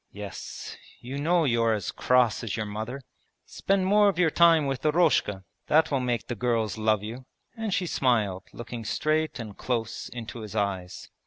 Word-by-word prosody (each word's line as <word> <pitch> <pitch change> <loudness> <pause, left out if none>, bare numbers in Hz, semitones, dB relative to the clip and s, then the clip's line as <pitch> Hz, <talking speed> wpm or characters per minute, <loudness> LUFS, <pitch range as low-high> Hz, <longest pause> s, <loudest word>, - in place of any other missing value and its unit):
'Yes, 100 0 -8 0.2
you 130 +3 -6
know 170 +3 +2
you're 115 -3 +2
as 100 -4 -3
cross 125 -3 +2
as 110 -3 -3
your 110 - -2
mother.' 110 +6 -5 0.4
'Spend 195 -1 0
more 205 +1 +5
of 190 - -2
your 175 -3 +3
time 165 -2 +5
with 135 -2 -3
Eroshka; 150 - +2 0.2
that 155 +1 +4
will 135 - +2
make 125 -2 -1
the - - -4
girls 115 -2 0
love 110 -2 +1
you!' 120 +4 -7 0.3
And 225 -2 -3
she 185 0 0
smiled, 110 - +1
looking 120 0 -7
straight 155 +8 0
and 110 -5 -7
close 115 -3 -3
into 120 0 -7
his 110 -1 -8
eyes. 95 -3 -3
120 Hz, 175 wpm, -27 LUFS, 110-155 Hz, 0.4 s, more